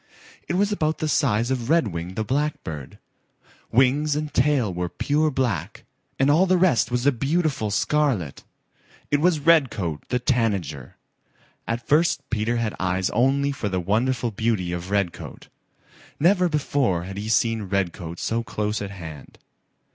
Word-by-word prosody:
It 170 - -1
was 205 +2 +2
about 155 -6 0
the 155 - -2
size 120 -5 +1
of 125 -2 -2
Redwing 95 - 0
the 110 - -1
Blackbird. 130 - -3 0.7
Wings 140 +5 +3
and 150 0 -3
tail 125 -7 +2
were 90 0 -3
pure 150 - +1
black 125 - -2 0.3
and 135 +2 +3
all 175 +6 +4
the 185 0 +3
rest 145 -11 +3
was 125 +1 -1
a 145 - +6
beautiful 140 -2 0
scarlet. 110 - 0 0.7
It 145 0 +2
was 170 -2 +3
Redcoat 115 - +2
the 125 - +1
Tanager. 100 - -1 0.7
At 115 0 -3
first 160 +4 +2
Peter 115 +1 0
had 115 -2 -1
eyes 95 0 0
only 140 +3 +2
for 125 -7 -3
the 95 -1 -1
wonderful 115 +6 0
beauty 105 -4 -1
of 85 +1 -5
Redcoat. 100 -4 -3 0.7
Never 180 +2 +4
before 140 - 0
had 95 +2 -7
he 105 +1 -5
seen 110 -2 +1
Redcoat 90 -3 -2
so 115 +5 -1
close 105 -2 -3
at 100 - -4
hand. 80 -7 -10
115 Hz, 150 wpm, -24 LUFS, 95-145 Hz, 0.7 s, a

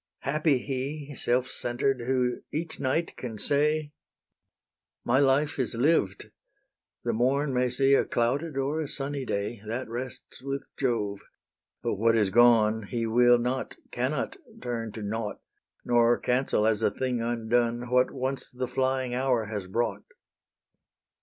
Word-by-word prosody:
Happy 150 0 +2
he, 140 +3 -4
Self 125 -1 0
centred, 125 +1 -1
who 125 -2 +1
each 160 +2 -4
night 140 +5 0
can 115 -4 -6
say, 150 +4 +1 1.1
"My 125 +3 +3
life 140 +1 +2
is 120 -3 -1
lived: 120 - +1 0.7
the - - 0
morn 135 +4 +1
may 125 0 +2
see 135 +2 +3
A - - +5
clouded 135 +6 -1
or 140 +4 0
a 155 - -3
sunny 140 -1 -3
day: 100 0 -3
That 115 +3 -4
rests 125 +2 -7
with 140 +1 -5
Jove: 105 -6 -1 0.6
but - - -1
what 115 +2 +3
is 105 -4 +2
gone, 110 -2 +5
He 115 -2 -1
will 120 +2 +5
not, 125 +2 -2 0.2
cannot 130 - -2 0.2
turn 115 - -4
to 110 - -6
nought; 105 +1 -3 0.5
Nor 120 0 +4
cancel, 125 -4 +1
as 110 -1 +2
a - - +3
thing 125 +3 -2
undone, 120 +1 0
What 125 0 +4
once 130 0 -3
the 125 0 -4
flying 130 0 0
hour 125 -3 +1
has 100 -3 -4
brought." 120 +6 -1
125 Hz, 145 wpm, -28 LUFS, 115-135 Hz, 1.1 s, A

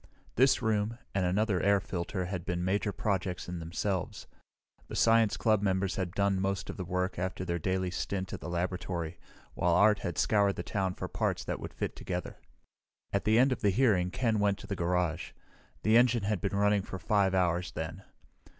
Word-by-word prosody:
This 130 0 +4
room, 110 +1 0 0.2
and 95 -2 +1
another 100 0 +1
air 100 0 +4
filter, 90 +1 -3
had 90 -1 -4
been 90 -1 -2
major 100 +2 0
projects 95 -3 -2
in 90 -1 -4
themselves. 90 +3 -3 0.6
The - - -7
science 115 -2 +4
club 110 -3 +2
members 95 -1 0
had 95 -1 -3
done 100 -2 +1
most 100 0 -1
of - - -12
the 95 - -3
work 90 0 -2
after 95 0 -3
their 85 -1 -1
daily 95 +2 -1
stint 95 +1 -3
at - - -4
the 75 - -6
laboratory, 90 -1 -3 0.3
while 85 -1 +2
Art 105 +2 +5
had 85 - -4
scoured 100 -2 +3
the - - -4
town 95 -2 -2
for - - -4
parts - - -1
that - - -3
would - - -8
fit - - -3
together. 90 -1 -5 0.7
At 100 - 0
the 110 +1 +4
end 130 +3 +5
of 130 - -2
the 105 - +3
hearing 100 -5 +3
Ken 115 +1 0
went 100 -1 +2
to - - -11
the 100 - -3
garage. 90 -1 -1 0.5
The 110 +2 +5
engine 120 -2 +4
had 100 -3 -1
been 100 - -1
running 105 0 +3
for 95 - -7
5 95 +1 +2
hours 90 -1 +1
then. 80 +4 -5
95 Hz, 195 wpm, -30 LUFS, 90-105 Hz, 0.7 s, Art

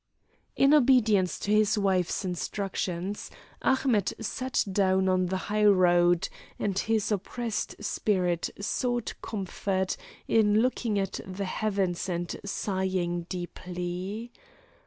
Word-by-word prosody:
In 275 +2 +5
obedience 235 -9 +4
to 205 - -1
his 215 0 +4
wife's 190 -2 +1
instructions, 185 +1 -3 0.3
Ahmet 260 -7 +2
sat 255 +4 -1
down 190 -1 +2
on 185 -1 +2
the 190 +1 -1
highroad, 180 -4 +4 0.3
and 200 -2 -1
his 220 -1 0
oppressed 215 +3 -2
spirit 180 -5 0
sought 240 +3 -1
comfort 190 -2 -2 0.3
in 215 -1 +4
looking 240 -4 0
at 195 -1 -2
the 190 +1 -5
heavens 195 -3 -1
and 175 -1 -2
sighing 185 -4 -1
deeply. 180 +4 -5
195 Hz, 105 wpm, -28 LUFS, 185-215 Hz, 0.3 s, In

